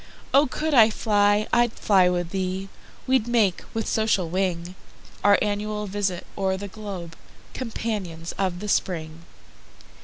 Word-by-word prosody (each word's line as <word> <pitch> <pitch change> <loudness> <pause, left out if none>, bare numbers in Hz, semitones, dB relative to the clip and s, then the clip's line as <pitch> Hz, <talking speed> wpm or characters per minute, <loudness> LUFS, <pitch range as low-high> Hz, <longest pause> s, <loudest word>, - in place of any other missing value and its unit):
O 280 +2 +6
could 305 +4 -2
I 225 -4 +7
fly, 205 -1 +2
I'd 240 -1 +3
fly 190 -3 +3
with 175 -1 -2
thee:We'd 195 +6 -2
make, 220 -7 +2
with 225 - -1
social 220 -5 +1
wing, 180 -1 -1 0.5
Our 205 0 +6
annual 210 0 -2
visit 195 -3 -2
o'er 190 -1 0
the 200 +1 -6
globe, 190 -5 -7 0.4
Companions 205 -9 -4
of 185 -2 -2
the 210 - -5
Spring. 165 -4 -2
200 Hz, 130 wpm, -24 LUFS, 180-215 Hz, 0.5 s, I